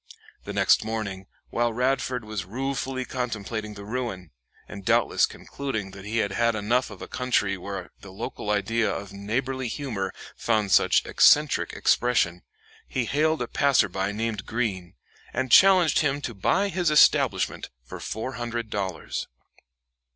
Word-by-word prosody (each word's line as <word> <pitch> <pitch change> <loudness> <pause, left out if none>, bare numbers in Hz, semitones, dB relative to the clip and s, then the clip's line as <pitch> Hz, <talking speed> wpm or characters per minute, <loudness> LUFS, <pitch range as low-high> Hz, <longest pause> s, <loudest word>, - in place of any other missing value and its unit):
The - - -5
next - - +4
morning, 105 -4 -4 0.2
while 120 0 +1
Radford 125 -1 0
was 105 -3 -4
ruefully 130 +5 -3
contemplating 110 -3 -4
the 100 0 -9
ruin, 110 -7 -4 0.4
and 100 -1 -9
doubtless - - +3
concluding 110 -9 -5
that 95 0 -11
he 110 +2 -2
had 100 -3 +1
had 115 +2 +1
enough 115 +5 +1
of - - -10
a - - -7
country 125 -6 0
where 95 0 -7
the 100 - -12
local 105 +1 -6
idea 110 +2 +1
of 100 0 -6
neighborly 125 +6 -2
humor 110 -7 -3 0.2
found 110 -4 0
such - - +4
eccentric - - +4
expression, 115 -8 +2 0.5
he 130 -2 -1
hailed 155 +5 +1
a - - -5
passer 140 -7 +3
by 95 +2 -2
named 110 -1 -3
Greene, 105 -7 -2 0.4
and 130 0 -2
challenged 185 - +6
him 145 -2 +1
to 120 - -4
buy 195 - +1
his 180 -3 +1
establishment 150 - +3
for - - -9
four 110 +4 -4
hundred 120 -2 -4
dollars. 95 -5 -3
115 Hz, 150 wpm, -26 LUFS, 100-130 Hz, 0.5 s, challenged